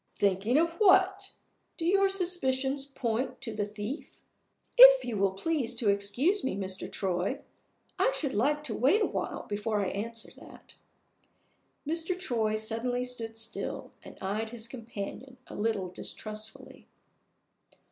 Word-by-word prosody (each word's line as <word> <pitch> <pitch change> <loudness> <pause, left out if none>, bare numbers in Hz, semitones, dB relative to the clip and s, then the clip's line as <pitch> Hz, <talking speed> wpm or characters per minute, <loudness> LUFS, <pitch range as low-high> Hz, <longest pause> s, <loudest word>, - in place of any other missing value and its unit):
"Thinking 200 +6 +2
of 335 +1 +1
what? 410 -4 +4 0.4
Do 330 - -3
your 390 +2 +4
suspicions 275 -8 +1
point 250 -3 -2
to 225 - -4
the 210 -1 -2
thief?" 210 +7 -6 0.7
"If - - +10
you 235 - -3
will 195 -1 +2
please 250 +2 -1
to 230 -3 +1
excuse 205 - +2
me, 265 - -1
Mr. 190 -1 -4
Troy, 190 +8 -1 0.6
I - - +4
should 280 -4 -2
like 295 +8 +1
to - - -3
wait 315 - +3
a - - +4
while - - -3
before 210 +1 -1
I 195 - 0
answer 225 +3 -4
that." - - -15 1.1
Mr. 330 +3 -2
Troy 225 -11 0
suddenly 230 +3 -1
stood 230 -3 -5
still, 225 0 -5
and - - -12
eyed 210 +4 -2
his 230 -1 -7
companion 235 +2 -7
a - - -11
little 205 -3 -1
distrustfully. 215 +4 -7
235 Hz, 140 wpm, -29 LUFS, 210-295 Hz, 1.1 s, If